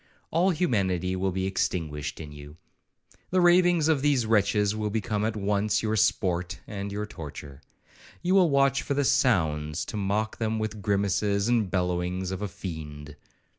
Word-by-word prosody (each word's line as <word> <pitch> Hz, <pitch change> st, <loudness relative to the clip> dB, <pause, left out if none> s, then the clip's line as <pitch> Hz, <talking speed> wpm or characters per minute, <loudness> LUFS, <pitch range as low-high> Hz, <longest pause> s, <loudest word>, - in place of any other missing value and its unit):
All 175 Hz, +4 st, +3 dB
humanity 95 Hz, -, 0 dB
will 95 Hz, +1 st, 0 dB
be 95 Hz, +1 st, -2 dB
extinguished 75 Hz, -6 st, -2 dB
in 75 Hz, -2 st, -8 dB
you. 75 Hz, +1 st, -11 dB, 0.7 s
The 185 Hz, -, +2 dB
ravings 175 Hz, -2 st, +4 dB
of 155 Hz, -4 st, +2 dB
these 140 Hz, -5 st, +2 dB
wretches 105 Hz, -1 st, +2 dB
will 105 Hz, -1 st, -2 dB
become 105 Hz, 0 st, -1 dB
at 110 Hz, 0 st, -1 dB
once 105 Hz, +1 st, 0 dB
your 110 Hz, 0 st, 0 dB
sport 90 Hz, -4 st, 0 dB
and 100 Hz, -1 st, -5 dB
your 105 Hz, +1 st, -3 dB
torture. 75 Hz, -6 st, -9 dB, 0.6 s
You 180 Hz, +1 st, +2 dB
will 185 Hz, -3 st, +5 dB
watch 140 Hz, -1 st, +3 dB
for 140 Hz, -, -2 dB
the 140 Hz, 0 st, +1 dB
sounds, 75 Hz, -, +1 dB
to -, -, -5 dB
mock 105 Hz, +2 st, -1 dB
them 110 Hz, -1 st, -1 dB
with 110 Hz, -1 st, -2 dB
the 105 Hz, -, -10 dB
grimaces 100 Hz, 0 st, 0 dB
and 115 Hz, -5 st, +2 dB
bellowings 90 Hz, 0 st, -1 dB
of 95 Hz, +1 st, -4 dB
a 105 Hz, -, -1 dB
fiend. 75 Hz, -5 st, -8 dB
100 Hz, 170 wpm, -27 LUFS, 90-115 Hz, 0.7 s, will